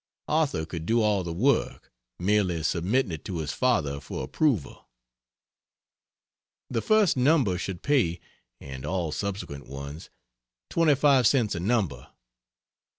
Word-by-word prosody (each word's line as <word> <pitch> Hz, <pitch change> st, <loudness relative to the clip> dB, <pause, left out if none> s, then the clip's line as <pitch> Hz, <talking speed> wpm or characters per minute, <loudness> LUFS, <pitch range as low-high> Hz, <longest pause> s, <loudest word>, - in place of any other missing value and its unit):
Arthur 150 Hz, -, +1 dB
could 80 Hz, 0 st, -6 dB
do 115 Hz, +1 st, +3 dB
all 105 Hz, -3 st, +2 dB
the 85 Hz, -, -4 dB
work, 125 Hz, +12 st, 0 dB, 0.3 s
merely 90 Hz, -3 st, +1 dB
submitting 95 Hz, -, 0 dB
it 80 Hz, -2 st, -6 dB
to 90 Hz, -, -4 dB
his 75 Hz, -2 st, -3 dB
father 80 Hz, -, +1 dB
for 70 Hz, -, -6 dB
approval. 130 Hz, -, -1 dB, 1.8 s
The 115 Hz, -3 st, 0 dB
first 215 Hz, -, +3 dB
number 130 Hz, -, +3 dB
should 90 Hz, -1 st, -5 dB
pay 115 Hz, -, +2 dB, 0.4 s
and 65 Hz, -1 st, -8 dB
all 85 Hz, 0 st, -2 dB
subsequent 95 Hz, -6 st, -5 dB
ones 70 Hz, +4 st, -8 dB, 0.6 s
25 145 Hz, -5 st, +4 dB
cents 120 Hz, -7 st, +2 dB
a 85 Hz, -, -3 dB
number. 95 Hz, -, -1 dB
95 Hz, 125 wpm, -26 LUFS, 80-130 Hz, 1.8 s, 25